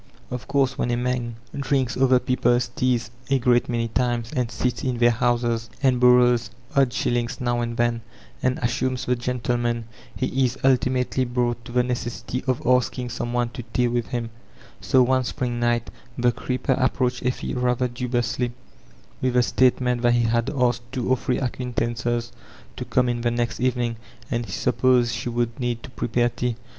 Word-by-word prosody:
Of 125 0 -5
course 135 -1 +1
when - - 0
a 120 - +1
man 120 -1 -2 0.2
drinks 135 -2 0
other 130 0 +4
people's 125 -1 +1
teas 125 -5 0 0.2
a 135 - +4
great 120 -1 +2
many 115 -1 0
times, 120 0 -1
and 125 -3 0
sits 125 0 -2
in 125 -2 -1
their 120 0 +5
)iouses, 120 -1 0
and 130 -2 +3
Borrows 125 -2 +5 0.3
odd 135 -2 +4
shiHings 120 -1 -1
now 120 -1 0
and 115 0 -3
then, 120 -1 +1 0.4
and 130 0 +1
assumes 125 0 -1
the 125 - +2
gentleman, 120 -1 -1 0.3
he 130 +1 0
is 125 +1 0
ultimately 130 0 +2
brought 120 -1 -1
to - - -9
the 125 0 +3
necessity 125 0 -3
of 130 -2 +1
askii^ 125 0 +1
some 120 0 -3
one 120 -1 0
to 125 +1 -7
tea 125 -1 +3
with 120 -1 -1
him; 120 -3 -3 0.5
so 130 -1 +4
one 130 +1 +2
spring 120 -1 -3
night 120 -1 0 0.3
the 120 0 +3
creeper 130 +2 -1
approached 130 -1 0
Effie 125 0 -2
rather 125 0 +1
dubiously 120 0 -2 0.7
with 130 -1 0
the 125 - +5
state 130 +1 +3
ment 125 -1 0
that 120 0 +4
he 120 - +2
had 115 +2 +1
asked 125 -4 +1
two 130 -2 -3
or - - +6
three 125 0 -1
acquaintances 120 -1 -2 0.4
to - - -5
come 125 -1 +2
in 120 -1 -1
the 120 - +1
next 120 -1 -1
evening, 120 -2 0 0.3
and 120 -1 -1
he - - -8
supposed 125 -2 +2
she 115 +1 -3
would 120 0 -2
need 120 -2 -2
to 130 - -10
prepare 120 0 +1
tea. 120 0 -2
120 Hz, 180 wpm, -24 LUFS, 120-125 Hz, 0.7 s, or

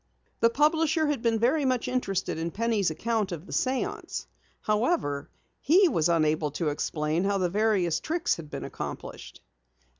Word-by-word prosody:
The 230 - +5
publisher 310 +4 +2
had 295 -5 -1
been 230 -1 +2
very 260 +7 +2
much 255 -3 0
interested 195 -9 -1
in 165 +1 -2
Penny's 220 -1 0
account 215 +4 -1
of 170 0 -6
the - - -12
séance. 260 0 -2 0.4
However, 210 - 0 0.3
he 360 +7 +5
was 165 - +1
unable 155 -2 +2
to 165 -3 0
explain 150 +3 -1
how 200 0 +1
the 180 -2 +1
various 190 -5 +1
tricks 340 +2 -1
had 160 -3 -9
been - - -6
accomplished. - - -7
210 Hz, 155 wpm, -27 LUFS, 165-260 Hz, 0.4 s, The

